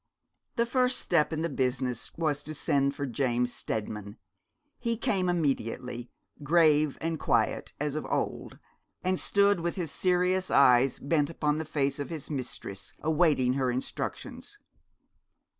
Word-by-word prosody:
The 235 - +2
first 250 +1 +2
step 165 -3 +1
in 160 -1 -2
the 165 - 0
business 130 -3 -1
was 150 -3 0
to 155 - -5
send 140 0 +1
for 140 - -3
James 125 -1 0
Steadman. 105 -1 -4 0.6
He 230 -1 -1
came 190 -5 0
immediately, 125 -6 -2 0.3
grave 155 -1 +3
and 165 -1 -2
quiet - - 0
as 150 -1 -1
of 155 - -4
old, - - -3 0.5
and 185 0 +1
stood 200 -1 +4
with 170 0 -2
his 170 -6 -3
serious 185 +1 +1
eyes 125 -1 +5
bent 145 0 +1
upon 150 -2 0
the 160 - -3
face 140 -2 -1
of 145 - -4
his 160 -3 -6
mistress, 125 -7 -4
awaiting 155 -5 +3
her 130 -1 0
instructions. 125 +2 -5
150 Hz, 140 wpm, -29 LUFS, 130-170 Hz, 0.6 s, eyes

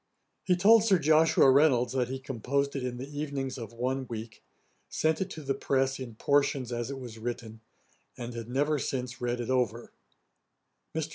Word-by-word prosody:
He 180 - +3
told 210 +5 +6
Sir 205 -4 +4
Joshua 155 -3 +5
Reynolds 130 -4 +4
that 125 -2 +1
he 130 +2 -4
composed 140 +2 -2
it 135 - -2
in 125 -1 -3
the 130 +2 -6
evenings 135 -3 -3
of 115 -1 -7
one 130 +3 -2
week, 110 -1 -7 0.5
sent 160 +3 0
it 190 - -2
to 155 - -8
the 135 0 0
press 135 0 0
in 120 -4 -7
portions 140 -1 +1
as 120 +1 -3
it 140 - -5
was 120 -4 -9
written, 110 -1 -6 0.6
and 120 -1 -6
had 115 0 -7
never 145 +4 +1
since 125 -2 -4
read 120 0 -1
it 120 +1 -3
over. 120 -2 -1 1.0
Mr. 160 -1 -2
130 Hz, 185 wpm, -29 LUFS, 120-140 Hz, 1.0 s, told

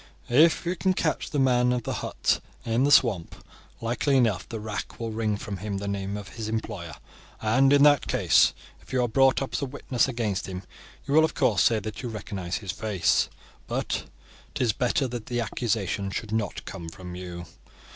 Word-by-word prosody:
If 155 +7 +5
we 175 +2 0
can 185 +1 +1
catch 155 -3 -1
the 150 - -3
man 125 -2 +3
of 125 -1 -1
the - - -3
hut - - 0 0.3
in 115 +3 +2
the 145 - +2
swamp, 105 - +4 0.5
likely 125 +4 +1
enough 115 -7 +1
the 115 - -4
rack 105 -1 -5
will 115 -1 -3
wring 110 -1 -1
from 105 -3 -5
him 100 +1 -4
the 100 +1 -4
name 100 0 -3
of 100 -1 -8
his 115 -2 -6
employer, 105 -7 -4 0.4
and 130 +5 +3
in 145 0 +6
that 145 -2 +5
case, - - +4 0.3
if - - -16
you 130 -1 +2
are - - +1
brought 135 +3 +3
up 135 - -7
as - - -1
a - - 0
witness 130 -2 0
against 110 -6 -2
him 95 0 -6 0.4
you 140 - -2
will 160 +1 +7
of 160 - 0
course 125 -8 +3
say 115 - +4
that 110 +2 -6
you 125 - -4
recognize 100 -4 -4
his 100 -4 -4
face; 105 -4 +1 0.4
but - - -2 0.5
'tis 120 -4 +2
better 125 +4 +1
that 120 -3 -6
the 120 -1 -1
accusation 110 -4 -1
should 105 +2 -5
not 110 -3 -2
come 85 -1 -7
from 90 +1 -9
you. 90 -1 -7
115 Hz, 200 wpm, -26 LUFS, 100-130 Hz, 0.5 s, will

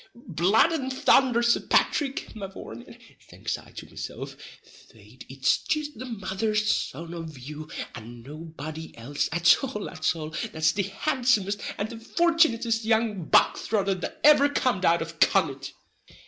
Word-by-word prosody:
"Blood 205 - +2
and 270 -5 -2
thunder, 260 -2 +3
Sir 235 0 +4
Pathrick, 275 -5 0
mavourneen," 190 - -9 0.3
thinks - - -4
I - - -13
to - - -8
mesilf, - - -7 0.6
"fait 110 +3 -15
it's 135 0 +1
jist 305 -2 -2
the 255 - -6
mother's 215 0 0
son 165 +5 -4
of 165 -4 -7
you, 150 +4 -9 0.2
and 115 +1 -10
nobody 155 +1 -8
else 135 +5 -2
at 170 - +4
all 250 -6 -4
at 160 -1 0
all, 155 -1 -7 0.2
that's 160 0 +2
the 200 -1 -2 0.2
handsomest 240 -8 +1 0.2
and 210 +3 -3
the 230 - -7
fortunittest 240 -6 +2
young 220 -5 +1
bog - - +4
throtter 200 -3 0
that 320 - -6
ever 290 -1 +7
cum'd 245 -9 0
out 170 0 +3
of 165 -1 -11
Connaught!" 140 -8 +2
195 Hz, 145 wpm, -26 LUFS, 155-240 Hz, 0.6 s, ever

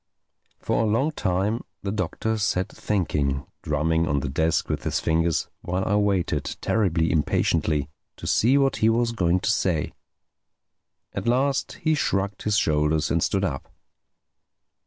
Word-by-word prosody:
For - - 0
a - - +1
long 115 +9 +1
time 100 -2 -1 0.2
the 100 - -2
Doctor 110 +3 -2
sat 95 -2 0
thinking, 75 -8 -1 0.2
drumming 80 +2 0
on 70 -3 +1
the 70 - -3
desk 80 +4 +1
with - - -3
his - - 0
fingers, 80 0 +1
while 90 +2 -2
I 105 - 0
waited, 95 -8 0
terribly 85 -7 +1
impatiently, 75 -1 +1 0.3
to - - -9
see 125 +5 +3
what 135 -1 +2
he 110 - +3
was 115 +1 +2
going 90 -5 +1
to 110 - +1
say. 90 -8 0 1.2
At - - -4
last 135 +3 +1
he 155 0 +3
shrugged 100 -8 -1
his 105 -1 +1
shoulders 75 -2 +1
and 85 - +2
stood 95 +3 +1
up. 70 -7 -4
95 Hz, 150 wpm, -24 LUFS, 80-110 Hz, 1.2 s, see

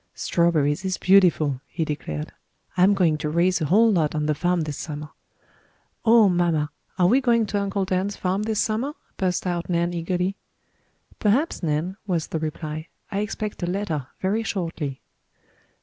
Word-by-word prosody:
"Strawberries 165 -2 +1
is 185 -1 -1
beautiful," 170 -8 +4
he 165 -2 -2
declared. 75 - -4 0.4
"I'm 185 +3 +5
going 165 -5 +2
to 150 -1 -2
raise 175 +3 +2
a - - +1
whole 220 +9 +5
lot 160 -6 +1
on 150 -1 0
the 150 - +2
farm 175 +3 +1
this 150 -2 -4
summer." 150 -1 -6 0.9
"Oh, 225 -2 +6
mamma, 170 -4 +1 0.3
are 180 - +4
we 245 +9 +4
going 235 -3 +3
to 205 0 -1
Uncle 200 -1 -1
Dan's 190 +2 -1
farm 185 +2 -1
this 215 -1 -1
summer?" 235 +7 0 0.2
burst 185 -1 0
out 175 -1 -2
Nan 170 0 +1
eagerly. 180 +3 -1 0.8
"Perhaps, 245 +10 +1
Nan," 165 +4 -1
was 170 -4 0
the 160 - -2
reply. 155 0 -4 0.2
"I 195 - -1
expect 210 0 -4
a 175 - -1
letter 175 -8 -2
very 200 +4 +1
shortly." 165 -10 -4
180 Hz, 165 wpm, -24 LUFS, 155-200 Hz, 0.9 s, Oh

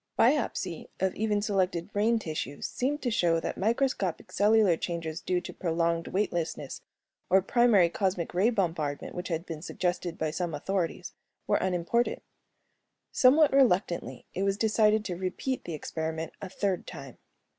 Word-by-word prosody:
Biopsy 225 - +1
of 190 0 +1
even 210 -1 0
selected 190 -3 0
brain 220 +3 +3
tissues 155 - -4
seemed 290 +4 -2
to 245 - 0
show 170 -6 +2
that - - -3
microscopic 225 -4 0
cellular 210 -3 +4
changes 165 -1 -4
due 180 -1 0
to - - -8
prolonged 170 -1 0
weightlessness 175 -4 -2 0.5
or 190 +1 +5
primary 225 -5 +4
cosmic 185 -1 -1
ray 190 +6 +3
bombardment, 165 -10 -2
which 180 +1 -5
had 165 -1 -2
been 160 -2 -6
suggested 175 -1 -2
by 155 -1 -1
some 170 -1 -2
authorities, 180 +3 -2 0.3
were - - +2
unimportant. 185 +6 0 0.9
Somewhat 285 +3 +5
reluctantly, 200 -10 +2
it 185 - -3
was 195 0 +1
decided 215 0 +3
to 180 - -3
repeat 190 +9 -3
the 170 - -4
experiment 160 +1 -4
a 195 - -5
third 190 -1 -2
time. 140 -7 -9
185 Hz, 145 wpm, -29 LUFS, 170-215 Hz, 0.9 s, or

